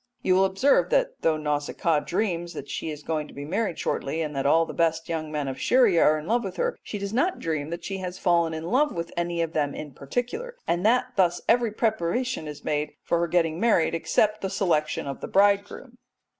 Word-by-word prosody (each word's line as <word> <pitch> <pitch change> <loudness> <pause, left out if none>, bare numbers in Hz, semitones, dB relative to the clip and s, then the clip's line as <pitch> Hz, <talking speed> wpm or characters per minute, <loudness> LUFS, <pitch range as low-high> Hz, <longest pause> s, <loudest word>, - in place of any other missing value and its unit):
'" - - -48
You 185 - +3
will 190 +1 +5
observe 195 +9 +3
that - - +1
though 160 -1 +2
Nausicaa 150 +1 0
dreams 175 -1 -2
that - - -7
she - - -4
is 150 -1 -7
going 155 -1 -2
to - - -15
be 140 +1 -6
married 195 +2 -1
shortly, 160 +4 -2
and 150 -2 -5
that 135 0 0
all 165 +3 +4
the - - -7
best 165 -1 0
young 160 -2 -3
men 150 -2 -2
of 130 - -5
Scheria 235 -10 +4
are 155 +1 +5
in 155 - -7
love 235 +5 +1
with 190 -2 -5
her, - - -1
she 210 - -6
does 200 +1 -5
not 335 +10 +1
dream 155 -2 -3
that 170 +1 -5
she 195 -1 -4
has 180 0 -5
fallen 170 -3 +2
in 160 0 -5
love 265 - +2
with 170 0 -4
any 175 0 -2
one 170 - +2
of 165 0 -4
them 145 -2 0
in 150 -2 -7
particular, 245 - -4
and 175 +1 0
that 250 +2 +2
thus 175 -2 +3
every 235 0 +3
preparation 220 -2 -1
is 150 -1 -9
made 150 0 -1
for 170 - +1
her 170 - +1
getting 165 -1 +1
married 210 -9 +3
except 210 +5 +1
the 195 - -2
selection 165 -7 0
of 140 -1 -6
the - - -4
bridegroom. 205 +5 +1
170 Hz, 235 wpm, -26 LUFS, 155-210 Hz, -, will